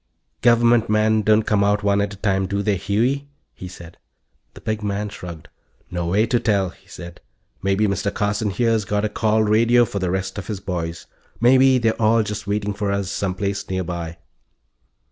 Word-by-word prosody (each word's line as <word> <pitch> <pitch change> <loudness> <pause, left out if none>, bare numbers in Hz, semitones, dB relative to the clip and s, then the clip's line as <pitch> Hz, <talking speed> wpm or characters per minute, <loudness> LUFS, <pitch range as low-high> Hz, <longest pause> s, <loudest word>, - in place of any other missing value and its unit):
"Government 120 -1 +4
men 110 0 +3
don't 110 +1 +3
come 105 -2 +1
out 105 +1 +1
one 100 0 +2
at 100 0 -3
a - - -18
time, 95 -2 0
do 100 +1 -2
they, 105 -1 +1
Huey?" 120 +9 0 0.3
he 90 - -9
said. 85 -2 -12 0.6
The - - -12
big 110 0 -3
man 105 0 -2
shrugged. 85 -5 -9 0.4
"No 85 -1 -2
way 100 +6 +2
to 120 +1 +1
tell," 100 -5 +1
he 95 - -24
said. 85 -4 -10 0.4
"Maybe 100 +2 +1
Mr. 100 0 -1
Carson 105 0 -1
here's 115 +1 +1
got 105 +1 -1
a - - -1
call 110 +1 +1
radio 115 +3 +4
for 100 - -4
the 95 -1 -1
rest 95 +2 -3
of 95 - -8
his 105 -3 -4
boys. 85 -4 -4 0.3
Maybe 130 +2 +5
they're 115 -1 0
all 110 +1 +4
just 105 -1 -5
waiting 105 0 -1
for 100 0 -2
us, 100 -2 -2
some 95 -2 -2
place 100 0 -3
nearby." 85 -2 -4
105 Hz, 190 wpm, -21 LUFS, 95-110 Hz, 0.6 s, Maybe